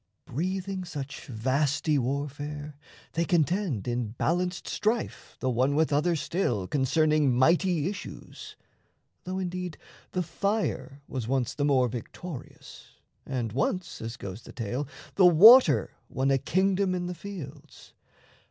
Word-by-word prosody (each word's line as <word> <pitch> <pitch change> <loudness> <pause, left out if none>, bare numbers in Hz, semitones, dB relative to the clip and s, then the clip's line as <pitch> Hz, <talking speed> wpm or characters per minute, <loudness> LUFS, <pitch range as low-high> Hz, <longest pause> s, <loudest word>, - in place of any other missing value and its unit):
Breathing 185 +6 -3
such 145 -5 -7
vasty 140 +5 +1
warfare, 145 +3 -4 0.4
they 165 - +1
contend 170 - 0
In 120 -1 -1
balanced 180 +7 -1
strife 220 +2 -2
the 130 - 0
one 130 +4 +2
with 155 -1 +2
other 165 +4 +2
still 140 - -1
Concerning 150 - +2
mighty 165 +3 +3
issues, 200 +1 -8 0.7
though 185 +1 -3
indeed 180 -2 -4 0.4
The 185 - 0
fire 195 -6 -2
was 125 -4 -4
once 130 -1 0
the 145 - -1
more 130 -3 +3
victorious, 125 +6 -9 0.3
And 120 -5 -2
once 180 +7 -2
as 115 +2 -5
goes 100 0 -7
the - - -13
tale 125 +5 -3 0.3
the 190 - +7
water 180 - +8 0.2
won 135 +2 0
A 135 - +3
kingdom 190 +4 +1
in 180 -1 -2
the 180 - -3
fields. 165 -6 -10
150 Hz, 130 wpm, -28 LUFS, 130-180 Hz, 0.7 s, water